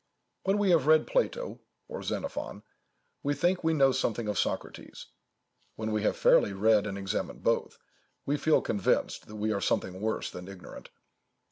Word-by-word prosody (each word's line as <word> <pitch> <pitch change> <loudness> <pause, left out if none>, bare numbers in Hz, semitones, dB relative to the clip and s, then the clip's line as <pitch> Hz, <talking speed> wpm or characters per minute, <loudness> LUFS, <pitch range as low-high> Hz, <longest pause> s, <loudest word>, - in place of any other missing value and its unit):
When 195 +2 +2
we 205 -2 +3
have 155 -5 +3
read 155 0 +5
Plato - - -1 0.3
or 485 0 -6
Xenophon, - - -4 0.6
we 145 0 0
think 175 +6 +1
we 160 0 +2
know 135 -2 +5
something 115 -3 -1
of 105 - -1
Socrates; - - -4 0.7
when 110 0 -3
we 110 0 0
have 105 - 0
fairly 100 - +4
read 105 +1 +3
and 100 -1 -4
examined 95 -1 -4
both, - - 0 0.5
we 145 - +1
feel 155 +1 +3
convinced 100 -4 0
that 105 - -10
we 105 +1 -1
are 100 - -2
something 95 0 -1
worse 110 0 -2
than 90 0 -8
ignorant. 95 -2 -11
110 Hz, 165 wpm, -29 LUFS, 100-160 Hz, 0.7 s, read